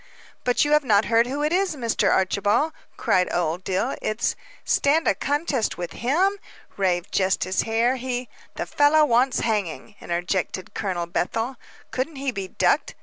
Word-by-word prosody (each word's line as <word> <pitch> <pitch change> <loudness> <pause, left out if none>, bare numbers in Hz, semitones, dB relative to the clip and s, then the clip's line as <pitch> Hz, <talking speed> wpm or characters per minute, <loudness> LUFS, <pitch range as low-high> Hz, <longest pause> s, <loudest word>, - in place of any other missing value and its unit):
"But 250 +3 +2
you 295 - -1
have 300 0 +5
not 215 -4 +3
heard 230 +1 +5
who 285 +3 -2
it 305 +3 +1
is, 375 -3 +1
Mr. 235 -5 +1
Archibald," 205 - +2 0.2
cried 180 0 +2
Old 175 +1 -1
Dill, 185 0 -1
"It 215 +2 -1
" - - -24
"Stand 305 +3 +2
a - - +5
contest 285 -4 -1
with 175 -2 -5
him?" 365 - +1 0.4
raved 180 -3 0
Justice 190 -1 +1
Hare. 235 +3 +2
"He 250 0 -3
" - - -27
"The - - -3
fellow 300 +1 +4
wants 250 0 +2
hanging," 210 -3 -2
interjected 180 +2 -2
Colonel 180 -4 -2
Bethel. 225 +9 -2 0.4
"Couldn't 270 +5 -2
he 270 -1 -2
be 195 -4 -5
ducked?" - - +1
230 Hz, 165 wpm, -24 LUFS, 190-280 Hz, 0.4 s, have